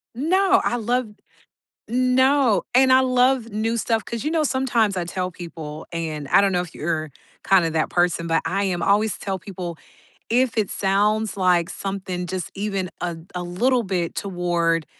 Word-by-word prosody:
No, 375 +8 +3
I 245 - 0
love 240 +1 0 0.8
no, 255 0 +3
and 260 +1 +5
I 260 - +6
love 255 -2 +2
new 225 +3 -1
stuff 225 0 0
'cause, 235 +1 -5
you 305 - -1
know, 320 -2 +2
sometimes 240 -7 +1
I 175 - 0
tell 180 +1 -3
people, 160 -3 -8
and 155 -4 -4
I 195 - +6
don't 200 - +2
know 180 -1 +1
if 175 -1 -9
you're 155 -1 -3 0.4
kinda 180 -4 +4
that 155 -1 0
person, 175 -1 +1
but 165 0 +2
I 195 +2 0
am 180 -3 -1
always 210 +1 +2
tell 195 -1 -3
people 180 -3 -7 0.5
"If 245 0 +1
it 210 -3 0
sounds 210 +2 +1
like 180 -2 +2
something 190 -2 -4
just 185 0 -4
even 195 -3 -3
a 170 -2 -3 0.2
a 180 - -3
little 240 +9 +1
bit 180 -5 -2
toward 175 -3 -1
195 Hz, 170 wpm, -22 LUFS, 175-240 Hz, 0.8 s, I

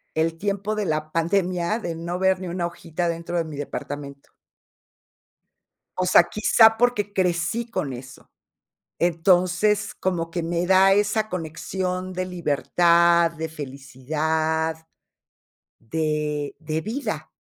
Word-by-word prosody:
el 160 +1 0
tiempo 200 +2 -1
de 210 -2 -1
la 155 -1 -2
pandemia, 180 +3 0
de 175 -7 -4
no 170 +2 -4
ver 190 0 +2
ni 185 - -6
una 175 0 -2
hojita 170 0 -3
dentro 170 +1 -3
de 170 - +1
mi 155 -2 -8
departamento. 140 0 -7 1.7
O 185 - 0
sea, 180 - +7
quizá 220 +1 +4
porque 225 -4 +1
crecí 180 +4 0
con 145 -11 -2
eso. 130 +1 -11 0.7
Entonces, 180 +4 +2
como 170 -3 -2
que 170 0 -3
me 170 +1 -1
da 190 +1 +6
esa 210 +1 +1
conexión 185 +2 -4
de 185 0 -2
libertad, 170 0 +3
de 160 0 -5
felicidad, 155 +3 -2 0.9
de 150 +3 -2
de 155 0 -3
vida. 215 - -4
170 Hz, 125 wpm, -24 LUFS, 160-185 Hz, 1.7 s, sea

